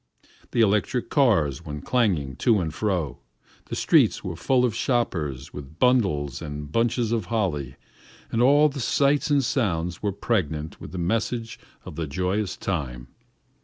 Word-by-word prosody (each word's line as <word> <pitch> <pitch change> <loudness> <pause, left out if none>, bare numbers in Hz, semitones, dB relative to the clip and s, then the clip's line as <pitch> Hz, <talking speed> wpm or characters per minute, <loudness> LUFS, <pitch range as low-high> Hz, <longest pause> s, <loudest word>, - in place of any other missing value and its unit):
The 115 - +1
electric 105 +3 +1
cars 90 - +2
went 75 -3 -7
clanging 90 - +1
to 115 -4 +3
and 80 -4 -3
fro, 90 - -2 0.5
the - - -5
streets - - +3
were - - -4
full 125 +10 +2
of 120 - 0
shoppers 90 - -1
with 75 +2 -9
bundles 95 - +2
and 75 0 -6
bunches 115 +2 +1
of 115 -5 0
holly, 85 - -2 0.6
and 115 - +1
all 145 +4 +6
the 140 -1 -5
sights 140 +4 +2
and 145 -2 +3
sounds 90 - -1
were 105 - 0
pregnant 80 -7 -2
with - - -8
the 95 - -6
message 115 +6 -2 0.3
of 75 - -9
the 80 -2 -2
joyous 95 +6 -1
time. 65 -9 -4
95 Hz, 155 wpm, -25 LUFS, 75-120 Hz, 0.6 s, all